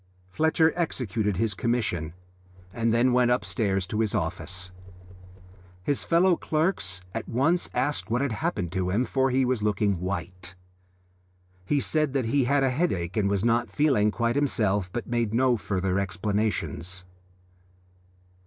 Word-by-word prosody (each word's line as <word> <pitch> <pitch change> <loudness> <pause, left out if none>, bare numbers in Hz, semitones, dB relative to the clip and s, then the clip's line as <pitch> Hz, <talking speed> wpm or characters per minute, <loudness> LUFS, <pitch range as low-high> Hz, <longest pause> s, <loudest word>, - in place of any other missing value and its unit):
Fletcher 160 - +3
executed 110 - -1
his 110 0 +1
commission 100 -8 -1 0.6
and 115 0 0
then 120 +2 +3
went 125 -1 +4
upstairs 105 -6 0
to 105 +3 -3
his 110 -1 +1
office. 95 0 -3 1.1
His 140 +7 0
fellow 175 +2 +4
clerks 155 - -1
at 115 - -5
once 160 +9 +1
asked 145 -6 -1
what 120 +2 +1
had 140 -3 0
happened 105 - -2
to 90 -1 -1
him, 110 +7 +1
for 135 0 +1
he 130 +1 +2
was 125 -3 0
looking 105 -2 +1
white. 90 -1 -5 1.1
He 145 - +2
said 150 0 0
that 135 -4 0
he 130 +3 +2
had 140 +2 +2
a 135 - +2
headache 100 - -1
and 100 -3 +1
was 100 +1 0
not 120 0 +2
feeling 135 -9 +2
quite 115 +2 0
himself, 105 -9 +1
but 120 0 -4
made 115 -2 -1
no 125 0 +3
further 95 -3 -1
explanations. 100 -3 -2
115 Hz, 145 wpm, -26 LUFS, 95-130 Hz, 1.1 s, went